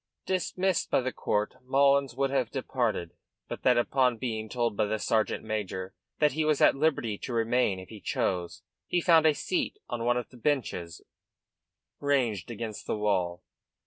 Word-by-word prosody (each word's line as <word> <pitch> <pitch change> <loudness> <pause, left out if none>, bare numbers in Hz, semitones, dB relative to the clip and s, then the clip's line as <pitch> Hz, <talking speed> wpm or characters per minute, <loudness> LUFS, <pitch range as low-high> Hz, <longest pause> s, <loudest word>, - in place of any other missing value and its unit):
Dismissed 185 0 0
by - - +3
the 130 +1 -2
court, 105 +3 -1
Mullins 140 0 +3
would 135 0 0
have 130 -4 +1
departed, 120 - -2 0.4
but - - -6
that 125 -1 +4
upon 125 0 +2
being 110 -2 -3
told 120 -3 -1
by 105 - +2
the 110 +1 -1
sergeant 110 +1 0
major 100 -4 -4 0.2
that 150 -1 +3
he 155 +4 0
was 155 -2 +2
at - - +6
liberty 135 -8 0
to 125 - -5
remain 115 -3 +2
if 95 - -11
he 110 -3 -10
chose 95 -7 -2 0.2
he 175 - +1
found 165 -2 +5
a 155 - +4
seat 180 +5 -2
on 120 -2 -3
one 120 +1 +2
of 125 - -4
the 125 - -15
benches 115 - -2 1.0
ranged 125 -10 0
against 115 -2 -6
the - - -1
wall. 90 -4 0
120 Hz, 175 wpm, -28 LUFS, 105-140 Hz, 1.0 s, at